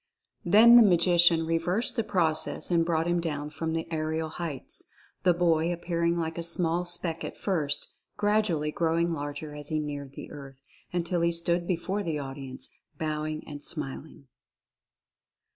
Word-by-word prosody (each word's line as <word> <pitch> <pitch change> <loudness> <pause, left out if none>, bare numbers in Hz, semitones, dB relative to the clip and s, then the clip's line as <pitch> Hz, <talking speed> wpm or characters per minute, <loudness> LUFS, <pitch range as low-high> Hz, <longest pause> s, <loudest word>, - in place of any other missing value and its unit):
Then 225 +6 +8
the - - +9
Magician 175 -4 +5
re 165 0 +1
versed 180 +10 -1
the 230 - 0
process 170 -4 0
and 170 -1 +3
brought 165 -1 0
him 175 0 +1
down 150 -3 -4
from 160 +1 -3
the 165 0 -2
aerial 160 0 -2
heights, 160 -5 -6 0.4
the 180 - +4
boy 170 -1 +2
appearing 170 0 -1
like 165 0 -3
a - - -1
small 170 +1 +1
speck 175 -2 0
at - - -6
first, 155 -8 +1 0.3
gradually 205 -8 +1
growing 170 +1 0
larger 145 -1 -5
as 145 -1 -4
he 155 - 0
neared 145 -2 -5
the - - -9
earth, 135 -2 -11 0.3
until 175 0 -1
he 170 0 +2
stood 170 +1 +2
before 190 +3 -1
the 165 -6 -2
audience, 135 -2 -6 0.3
bowing 155 0 -3
and 145 -1 -7
smil 145 -2 -4
ing. 140 -2 -18
165 Hz, 160 wpm, -28 LUFS, 155-175 Hz, 0.4 s, the